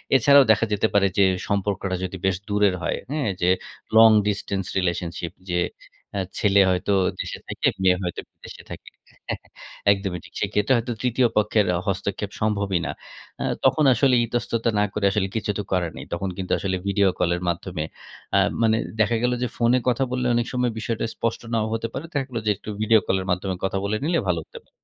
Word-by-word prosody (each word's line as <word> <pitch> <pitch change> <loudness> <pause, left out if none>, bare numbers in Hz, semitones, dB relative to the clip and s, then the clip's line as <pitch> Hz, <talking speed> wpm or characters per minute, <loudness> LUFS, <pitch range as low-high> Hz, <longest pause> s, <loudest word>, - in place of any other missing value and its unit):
এছাড়াও 140 +2 +7
দেখা 110 +1 +3
যেতে 105 +2 +2
পারে 100 -1 +4
যে 100 - +6 0.2
সম্পর্কটা 100 -1 -1
যদি 95 +1 -4
বেশ 95 -1 +2
দূরের 105 -2 +3
হয়, - - -1
হ্যাঁ, 145 -7 0
যে 90 - +3 0.5
long 110 0 +8
distance 100 -2 -2
relationship। 85 -2 -2 0.2
যে 90 0 +1 0.5
অ্যা 100 - -1 0.2
ছেলে 100 -1 +4
হয়তো 90 +2 +1 0.3
দেশে - - -5
থাকে - - -1 0.2
মেয়ে 90 -1 +4
হয়তো 90 - -3
বিদেশে - - -13
থাকে। - - -9 0.4
হ্যাঁ। - - -3 0.5
একদমই 95 -3 -1
ঠিক। - - -16
সেক্ষেত্রে 105 +4 +1
হয়তো 120 +1 -2
তৃতীয় 125 0 +2
পক্ষের 105 0 +3 0.2
হস্তক্ষেপ 100 +1 -2
সম্ভবই 100 -3 +1
না। - - -2 0.5
আ - - 0 0.2
তখন 155 - +4
আসলে 130 +2 +3
ইতস্ততা 115 0 -1
না - - +4
করে 105 - -1
আসলে 95 -1 0
কিছু 110 -1 -1
তো 105 - -2
করার 90 -3 0
নেই। - - -7
তখন 95 +3 -2
কিন্তু 95 -1 -4
আসলে 95 -1 -1
ভিডিও 100 0 +3
কলের 85 0 +1
মাধ্যমে 85 -1 -3 0.5
আ - - +6 0.2
মানে 110 -1 +3 0.2
দেখা 110 +2 +3
গেল 125 - +2
যে - - +1
ফোনে 120 +2 +3
কথা 125 +2 +1
বললে 125 0 -1
অনেক 120 0 +1
সময় 125 -1 +1
বিষয়টা 115 0 -2
স্পষ্ট 115 -1 -2
নাও 110 -2 +1
হতে 115 0 -2
পারে। - - -5
দেখা 140 -3 0
গেল 120 - -5
যে 105 - +3
একটু - - -10
ভিডিও 110 0 +5
কল 95 - +2
এর - - -6
মাধ্যমে 95 +1 -1
কথা 95 0 0
বলে 100 +2 0
নিলে 170 +1 +2
ভালো 85 -2 +1
হতে - - -11
পারে। - - -33
105 Hz, 195 wpm, -23 LUFS, 95-115 Hz, 0.5 s, long